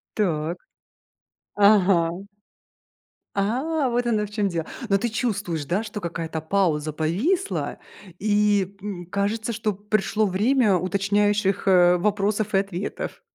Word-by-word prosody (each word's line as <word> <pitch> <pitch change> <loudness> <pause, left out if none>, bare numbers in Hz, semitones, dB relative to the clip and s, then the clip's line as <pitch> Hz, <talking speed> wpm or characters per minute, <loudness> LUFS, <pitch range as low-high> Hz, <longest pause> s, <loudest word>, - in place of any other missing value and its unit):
Так, 170 -5 -1 1.0
ага. 195 -5 +4 1.3
А, 260 +8 0
вот 240 +1 0
оно 215 -3 +1
в - - -10
чём 205 -2 0
дело. 165 -2 -3 0.2
Но 195 - +4
ты 230 +5 -1
чувствуешь, 205 - -2
да, 185 +9 -1
что 210 -1 -6
какая-то 165 -2 -4
пауза 160 -3 0
повисла 205 - -1 0.4
и, 205 -1 +2
м, 190 -4 -6
кажется, 210 +5 -2
что 215 0 -1
пришло 210 +2 0
время 210 +3 +2
уточняющих, 200 +2 +1
э, 180 -1 +5
вопросов 210 +2 0
и - - +5
ответов? 195 0 -4
200 Hz, 120 wpm, -24 LUFS, 180-215 Hz, 1.3 s, э